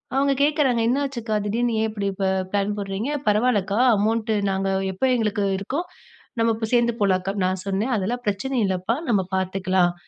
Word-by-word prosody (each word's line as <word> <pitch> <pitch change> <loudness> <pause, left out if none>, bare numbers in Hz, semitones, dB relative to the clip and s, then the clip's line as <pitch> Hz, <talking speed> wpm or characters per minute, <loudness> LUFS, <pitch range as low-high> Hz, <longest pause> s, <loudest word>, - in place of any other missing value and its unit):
அவங்க 275 +1 +3
கேட்குறாங்க, 285 -6 +2
"என்னாச்சுக்கா? 250 -4 -1
திடீர்னு 230 +3 0
ஏன் 220 - +1
இப்படி 205 -2 -3
இப்ப 195 0 -2 0.3
பிளான் 205 0 0
போடுறீங்க? 200 +6 -3 0.2
பரவாயில்லக்கா, 210 -2 +1 0.2
அமௌண்ட் 220 +2 0 0.2
நாங்க 195 0 -1 0.3
எப்ப 225 +8 -1
எங்களுக்கு 210 -3 0
இருக்கோ 255 +10 -3 0.6
நம்ம 230 0 +3
இப்ப 220 0 -3
சேர்ந்து 235 -1 +3
போகலாம் 190 -2 +3
அக்கா." 195 +2 -2
நான் 185 0 -1
சொன்னேன், 205 +6 0
'அதெல்லாம் 230 +5 -2
பிரச்சனை 210 +7 -1
இல்லைப்பா, 190 +4 -1
நம்ம 205 -5 +3
பார்த்துக்கலாம். 185 -1 +1
210 Hz, 160 wpm, -23 LUFS, 195-240 Hz, 0.6 s, அவங்க